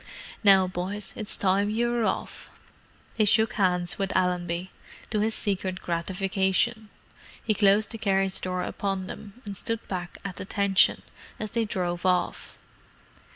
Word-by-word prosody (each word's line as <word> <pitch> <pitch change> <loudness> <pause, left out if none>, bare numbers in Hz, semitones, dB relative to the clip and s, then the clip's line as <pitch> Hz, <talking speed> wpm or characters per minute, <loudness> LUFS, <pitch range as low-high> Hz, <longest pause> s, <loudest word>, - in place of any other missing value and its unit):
"Now, 195 -2 +6
boys; 185 +3 -4
it's 215 - 0
time 195 +1 +2
you 235 +2 0
were 240 -2 +1
off." - - -3 0.7
They 215 - +4
shook 220 +3 +4
hands 180 -3 0
with 195 0 -1
Allenby, 180 -1 -1 0.4
to 215 - +1
his 220 +1 +1
secret 190 -2 -1
gratification. 190 +5 0 0.6
He 215 - +3
closed 205 0 +4
the 225 - -5
carriage 195 -2 +1
door 180 0 -2
upon 195 -2 -2
them, 205 +4 -9
and 200 -1 -5
stood 225 +4 -2
back 180 -2 -5
at 190 -3 -5
attention, 195 0 +2 0.4
as 215 -1 -4
they 230 -1 0
drove 175 -4 -2
off. 180 -1 0
195 Hz, 145 wpm, -27 LUFS, 185-215 Hz, 0.7 s, Now